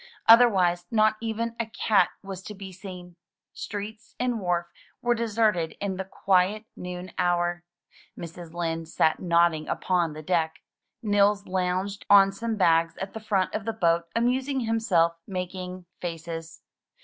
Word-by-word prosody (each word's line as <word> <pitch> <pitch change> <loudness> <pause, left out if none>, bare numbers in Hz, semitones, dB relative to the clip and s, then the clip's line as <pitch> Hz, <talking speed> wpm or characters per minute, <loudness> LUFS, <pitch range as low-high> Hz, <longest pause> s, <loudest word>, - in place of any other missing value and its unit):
Otherwise 190 -7 +6
not 215 -1 +3
even 230 0 -2
a 230 - 0
cat 215 -4 +2
was 195 -1 -7
to 210 +2 -8
be 195 -1 -8
seen. 180 -2 -10 0.4
Streets 210 +2 -7
and 245 -2 0
wharf 175 -3 0 0.3
were 240 0 +2
deserted 215 -8 0
in 195 -2 -2
the 190 - -2
quiet 195 +3 +1
noon 180 0 -7
hour. 175 0 +1 0.5
Mrs. 170 0 -8
Lind 165 -1 -3
sat 160 -1 +2
nodding 170 -3 +2
upon 175 -4 0
the 155 +1 -8
deck. 160 -1 -1 0.4
Nils 205 -1 +3
lounged 185 +2 -2
on 195 -1 +7
some 225 +3 -3
bags 165 -4 +3
at 190 +1 -5
the 220 - -5
front 205 -4 0
of 215 - -2
the 225 +2 -2
boat, 170 -5 +2
amusing 260 +3 +1
himself 195 -8 +2
making 185 -1 -5
faces. 165 -1 -6
185 Hz, 145 wpm, -26 LUFS, 175-215 Hz, 0.5 s, on